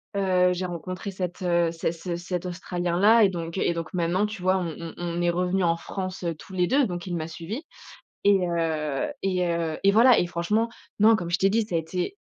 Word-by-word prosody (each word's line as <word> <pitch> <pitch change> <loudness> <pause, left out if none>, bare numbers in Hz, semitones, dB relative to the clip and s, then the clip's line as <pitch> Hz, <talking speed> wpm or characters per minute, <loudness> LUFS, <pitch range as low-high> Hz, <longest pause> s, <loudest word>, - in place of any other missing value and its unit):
heu, 185 -2 +3
j'ai 180 +1 -3
rencontré 185 +3 -5
cet, 180 -2 -5
heu, 170 -2 +2
cet 165 0 -1
ce 170 +1 -5
cet 175 +1 -4
australien 175 -1 -2
là 220 +3 +6
et - - +3
donc 170 -1 -5
et 175 - +1
donc 165 -1 -5
maintenant, 180 +3 +1
tu 210 -2 -6
vois, 185 +1 +3
on 170 -3 -3
on 165 -1 -7
on 175 0 -3
est 175 - +2
revenus 180 +2 +1
en 165 0 +3
France, 185 +2 -6
heu, 170 -1 -1
tous 170 - -13
les 180 -1 +1
2, 275 +5 +3
donc 175 -4 -5
il 175 -2 -3
m'a 160 -1 -3
suivi 175 - -6 0.6
et 195 -3 +4
heu 160 - -1
et 185 -2 0
heu, 170 -2 -1
et 200 - +6
voilà 235 +4 +6
et - - +2
franchement, 180 +7 0 0.3
non, 220 +2 +7
comme 175 -5 -4
je 175 - +1
t'ai 195 - +3
dit, 225 +2 +3
ça 175 - -3
a - - +4
été 180 - -3
180 Hz, 235 wpm, -25 LUFS, 170-190 Hz, 0.6 s, non